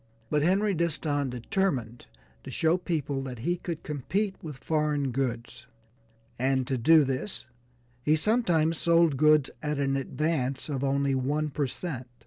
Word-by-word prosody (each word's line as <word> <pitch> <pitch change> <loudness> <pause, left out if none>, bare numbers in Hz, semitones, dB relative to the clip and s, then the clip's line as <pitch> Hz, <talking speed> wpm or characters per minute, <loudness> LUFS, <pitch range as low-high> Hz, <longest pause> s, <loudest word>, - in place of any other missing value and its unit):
But 150 - +2
Henry 195 +6 +2
Disston 155 -4 -1
determined 125 - -2 0.4
to - - -8
show 160 +2 +2
people 150 -6 -2
that 130 -2 -6
he 170 +10 -1
could 170 -2 -5
compete 190 +8 -2
with 150 -5 -7
foreign 150 -2 0
goods, 125 0 -3 0.7
and 130 0 +1
to 135 0 -1
do 155 +6 +6
this 135 +8 -3 0.6
he 150 +5 +3
sometimes 165 -5 +1
sold 170 -3 +4
goods 150 0 +4
at 150 -1 -2
an 135 -1 0
advance 135 -1 -1
of 140 -2 -2
only 140 0 +1
one 145 +3 0
per 140 0 -1
cent. 130 -1 -5
150 Hz, 145 wpm, -28 LUFS, 130-165 Hz, 0.7 s, do